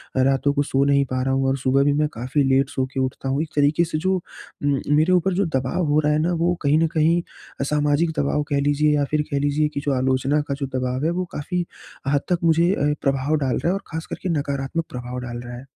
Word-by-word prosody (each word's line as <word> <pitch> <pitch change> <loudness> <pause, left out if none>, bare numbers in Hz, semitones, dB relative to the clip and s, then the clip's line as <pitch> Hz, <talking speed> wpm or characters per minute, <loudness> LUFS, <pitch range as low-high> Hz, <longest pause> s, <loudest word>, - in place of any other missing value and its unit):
अ, 130 - +3
रातों 135 +1 +2
को 145 - +1
सो 135 -1 +1
नहीं 140 -1 +3
पा 130 0 -2
रहा 135 - 0
हूँ 135 0 +1
और 135 - 0
सुबह 135 +1 +2
भी 145 0 +3
मैं 150 +1 +2
काफ़ी 130 +5 -1
लेट 135 0 +2
सो 130 - -1
के 135 - -2
उठता 130 +1 -2
हूँ। 140 +3 0
एक 160 - -4
तरीके 145 +3 +3
से 155 -1 -3
जो 185 +4 0
उम, 145 -5 -4 0.2
मेरे 160 +5 +3
ऊपर 180 +1 +2
जो 195 +2 +1
दबाव 130 +7 -1
हो 150 +1 +3
रहा 150 0 +2
है 150 - +2
ना, 170 +3 +1
वो 170 +1 +1
कहीं 145 +1 +3
न 165 - +3
कहीं 165 +2 +3 0.4
अ, - - +2
सामाजिक 150 +3 +1
दबाव 145 +1 +1
कह 140 - +1
लीजिए 145 +1 +2
या 145 -1 +1
फ़िर 150 - +2
कह 140 - +1
लीजिए 145 +2 +1
कि 140 - -2
जो 140 - +1
आलोचना 130 +3 +1
का - - +1
जो - - +1
दबाव 130 +3 -2
है 165 - +2
वो 180 +1 -2
काफ़ी 175 +4 -3 0.4
हद 140 0 +2
तक 175 - +2
मुझे 165 +1 +4
ए, 150 -6 +1
प्रभाव 135 +2 +1
डाल 135 -3 0
रहा - - -2
है 185 - +2
और 195 - -3
ख़ासकर 160 0 -6
के 185 - -1
नकारात्मक 140 +3 -3
प्रभाव 125 0 -6
डाल 120 -1 -6
रहा 120 - -7
है। 130 - -11
145 Hz, 260 wpm, -22 LUFS, 135-155 Hz, 0.4 s, मुझे